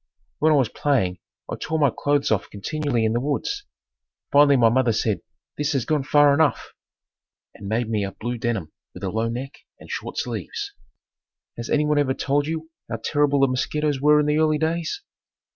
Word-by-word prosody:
When 155 Hz, +2 st, +4 dB
I -, -, +5 dB
was 130 Hz, -6 st, +3 dB
playing 95 Hz, -13 st, 0 dB, 0.3 s
I -, -, -5 dB
tore 160 Hz, -, -2 dB
my 145 Hz, -4 st, +3 dB
clothes 145 Hz, -3 st, +1 dB
off 110 Hz, -, 0 dB
continually 125 Hz, +2 st, -1 dB
in 110 Hz, -, +1 dB
the 120 Hz, -, +1 dB
woods. 405 Hz, -, -2 dB, 0.7 s
Finally 145 Hz, -1 st, +6 dB
my 115 Hz, -2 st, +5 dB
mother 120 Hz, -1 st, +2 dB
said, 110 Hz, -1 st, 0 dB, 0.4 s
"This 150 Hz, 0 st, 0 dB
has 135 Hz, -4 st, 0 dB
gone 155 Hz, -2 st, +1 dB
far 145 Hz, +1 st, +5 dB
enough!" 150 Hz, -2 st, +1 dB, 0.8 s
and 100 Hz, -, -10 dB
made 110 Hz, +3 st, 0 dB
me 110 Hz, -2 st, 0 dB
a 100 Hz, -, -3 dB
blue 120 Hz, +3 st, -5 dB
denim 110 Hz, -10 st, -2 dB, 0.2 s
with -, -, -10 dB
a 95 Hz, -, -1 dB
low 110 Hz, +1 st, -1 dB
neck 130 Hz, +4 st, -6 dB, 0.2 s
and -, -, -11 dB
short -, -, -5 dB
sleeves. 415 Hz, -3 st, -4 dB, 0.8 s
Has 115 Hz, -1 st, -6 dB
anyone 150 Hz, 0 st, +2 dB
ever 130 Hz, -2 st, +1 dB
told 145 Hz, +1 st, 0 dB
you 160 Hz, 0 st, -4 dB, 0.2 s
how -, -, -2 dB
terrible 145 Hz, -2 st, +2 dB
the 135 Hz, -, +5 dB
mosquitoes 145 Hz, +2 st, -1 dB
were 150 Hz, +1 st, +5 dB
in 150 Hz, -, +2 dB
the 150 Hz, +1 st, +2 dB
early 155 Hz, -1 st, +3 dB
days? 165 Hz, -, -2 dB
140 Hz, 190 wpm, -23 LUFS, 115-150 Hz, 0.8 s, Finally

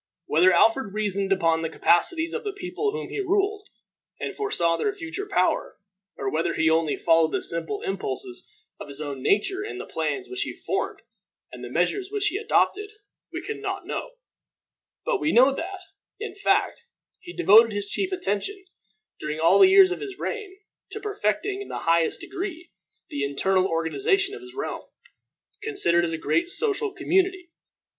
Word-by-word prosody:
Whether 175 Hz, +5 st, +4 dB
Alfred 225 Hz, 0 st, +3 dB
reasoned 200 Hz, -2 st, -1 dB
upon 165 Hz, -4 st, +2 dB
the 165 Hz, -, -2 dB
capacities 320 Hz, -, +2 dB
of 470 Hz, -, -3 dB
the 410 Hz, -2 st, -3 dB
people 395 Hz, +2 st, -3 dB
whom 455 Hz, +2 st, -5 dB
he -, -, -4 dB
ruled, 400 Hz, +2 st, 0 dB, 0.5 s
and -, -, -4 dB
foresaw 170 Hz, -, +1 dB
their 405 Hz, -, -1 dB
future 395 Hz, +3 st, -5 dB
power, 395 Hz, -, 0 dB, 0.4 s
or 135 Hz, -, -4 dB
whether 160 Hz, +2 st, 0 dB
he 160 Hz, 0 st, +3 dB
only 160 Hz, -2 st, +2 dB
followed 165 Hz, -2 st, +3 dB
the -, -, -1 dB
simple 170 Hz, +5 st, -3 dB
impulses 130 Hz, -10 st, -5 dB, 0.3 s
of -, -, -8 dB
his 140 Hz, 0 st, -8 dB
own 145 Hz, -3 st, -5 dB
nature 375 Hz, -, +1 dB
in 425 Hz, -, -6 dB
the -, -, -6 dB
plans 390 Hz, -1 st, -3 dB
which 380 Hz, +1 st, -3 dB
he -, -, -2 dB
formed -, -, -3 dB, 0.5 s
and -, -, -10 dB
the -, -, -6 dB
measures 390 Hz, -2 st, 0 dB
which 420 Hz, 0 st, +2 dB
he 385 Hz, -, -3 dB
adopted, 415 Hz, -1 st, +1 dB, 0.4 s
we -, -, -5 dB
can 430 Hz, -2 st, -5 dB
not 390 Hz, -2 st, -4 dB
know; -, -, -5 dB, 0.9 s
but -, -, +1 dB
we 310 Hz, -, +1 dB
know 260 Hz, +3 st, +6 dB
that, 370 Hz, +6 st, -5 dB, 0.4 s
in 440 Hz, -3 st, -5 dB
fact, 405 Hz, +3 st, +1 dB, 0.4 s
he 355 Hz, -, -10 dB
devoted 230 Hz, -, +6 dB
his 205 Hz, -1 st, -2 dB
chief 380 Hz, -, -2 dB
attention, 370 Hz, -, -3 dB, 0.5 s
during 150 Hz, +1 st, -4 dB
all 165 Hz, -, +5 dB
the 385 Hz, -1 st, +8 dB
years 385 Hz, -1 st, +7 dB
of 370 Hz, -, -3 dB
his 395 Hz, -3 st, -7 dB
reign, 410 Hz, -4 st, -5 dB, 0.3 s
to 435 Hz, -, -6 dB
perfecting 400 Hz, -, -1 dB
in 405 Hz, -, -7 dB
the -, -, -5 dB
highest 165 Hz, 0 st, +2 dB
degree 360 Hz, -3 st, -6 dB, 0.4 s
the 140 Hz, -, -3 dB
internal 185 Hz, +7 st, +2 dB
organization 390 Hz, -, +1 dB
of 425 Hz, -, -8 dB
his 370 Hz, 0 st, -12 dB
realm, 405 Hz, -, -4 dB, 0.8 s
considered 390 Hz, -, +2 dB
as 170 Hz, -, 0 dB
a 165 Hz, -, -2 dB
great 340 Hz, -, 0 dB
social 425 Hz, +1 st, 0 dB
community. 370 Hz, -1 st, 0 dB
360 Hz, 175 wpm, -25 LUFS, -, 0.9 s, the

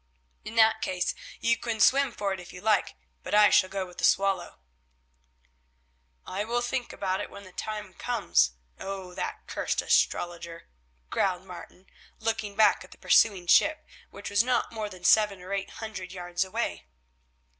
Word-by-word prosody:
In 225 Hz, -, -8 dB
that 220 Hz, -1 st, +5 dB
case 180 Hz, -1 st, -1 dB, 0.3 s
you 230 Hz, 0 st, +2 dB
can 230 Hz, -1 st, -4 dB
swim 275 Hz, +2 st, +4 dB
for 200 Hz, -3 st, -2 dB
it 190 Hz, -, -6 dB
if 180 Hz, -, -11 dB
you 180 Hz, -, -10 dB
like, 210 Hz, +1 st, +1 dB, 0.3 s
but -, -, -2 dB
I 210 Hz, -1 st, +7 dB
shall 185 Hz, -, +4 dB
go 195 Hz, -1 st, -3 dB
with 180 Hz, -1 st, -13 dB
the -, -, -6 dB
Swallow." 195 Hz, 0 st, +2 dB, 1.7 s
"I 195 Hz, +2 st, -3 dB
will 240 Hz, +2 st, -1 dB
think 245 Hz, 0 st, -2 dB
about 190 Hz, -1 st, -2 dB
it -, -, -6 dB
when 200 Hz, -, -11 dB
the 185 Hz, -, -13 dB
time 210 Hz, -1 st, -6 dB
comes. 175 Hz, -, +1 dB, 0.3 s
Oh! 190 Hz, -2 st, -6 dB
that -, -, -5 dB
cursed -, -, -2 dB
astrologer," 170 Hz, -1 st, 0 dB, 0.4 s
growled 185 Hz, -1 st, 0 dB
Martin, 185 Hz, 0 st, -11 dB, 0.3 s
looking 220 Hz, -2 st, -2 dB
back 215 Hz, 0 st, +4 dB
at -, -, -15 dB
the -, -, -15 dB
pursuing 195 Hz, -5 st, +3 dB
ship, 310 Hz, -, +4 dB, 0.2 s
which 200 Hz, 0 st, -8 dB
was 205 Hz, +1 st, +5 dB
not 250 Hz, -1 st, 0 dB
more 215 Hz, -2 st, -4 dB
than 185 Hz, -2 st, -13 dB
seven 210 Hz, -1 st, +4 dB
or 185 Hz, +2 st, -7 dB
eight 195 Hz, 0 st, -2 dB
hundred 210 Hz, -5 st, -7 dB
yards 175 Hz, -1 st, -2 dB
away. 85 Hz, -, -4 dB
200 Hz, 170 wpm, -28 LUFS, 185-220 Hz, 1.7 s, I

